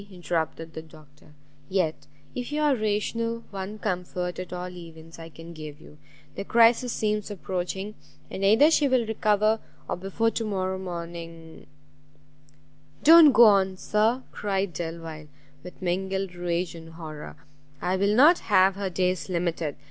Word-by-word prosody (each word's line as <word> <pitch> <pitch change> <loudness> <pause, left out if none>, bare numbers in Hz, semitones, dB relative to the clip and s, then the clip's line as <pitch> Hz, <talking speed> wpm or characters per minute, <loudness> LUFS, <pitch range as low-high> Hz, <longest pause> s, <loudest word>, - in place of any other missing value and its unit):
interrupted 165 -2 -3
the 160 - -6
Doctor; 150 -1 -18 0.3
"yet, 180 -5 -1 0.3
if 245 +2 -5
you 300 - -1
are 295 -2 +3
rational, 230 +2 -1
one 195 +1 -6
comfort, 180 -3 -3
at 185 - -7
all 180 0 -4
events, 165 -2 -11
I 165 0 -9
can 165 +1 -11
give 155 -2 -9
you; 150 -1 -16 0.3
the - - -5
crisis 235 +3 +4
seems 210 -2 -1
approaching, 190 +1 -4 0.4
and 195 - -5
either 225 +11 +6
she 295 -3 +3
will 255 -3 +2
recover, 215 0 +2 0.3
or - - -2
before 195 +5 -1
to 225 - -2
morrow 190 -3 -2
morning" 170 -2 -8 1.4
"Don't 320 -1 +9
go 240 - +7
on, 195 -3 +4
Sir!" 220 +6 +1
cried 195 -3 -2
Delvile, 165 -1 -6 0.3
with 180 - -12
mingled 190 +1 -2
rage 175 0 -2
and 165 -1 -11
horror, 155 -2 -8 0.4
"I 180 +4 0
will 200 +2 +2
not 305 +8 +7
have 195 -1 +5
her 200 0 -3
days 185 +1 -1
limited! 170 -4 -2
185 Hz, 150 wpm, -26 LUFS, 170-215 Hz, 1.4 s, Don't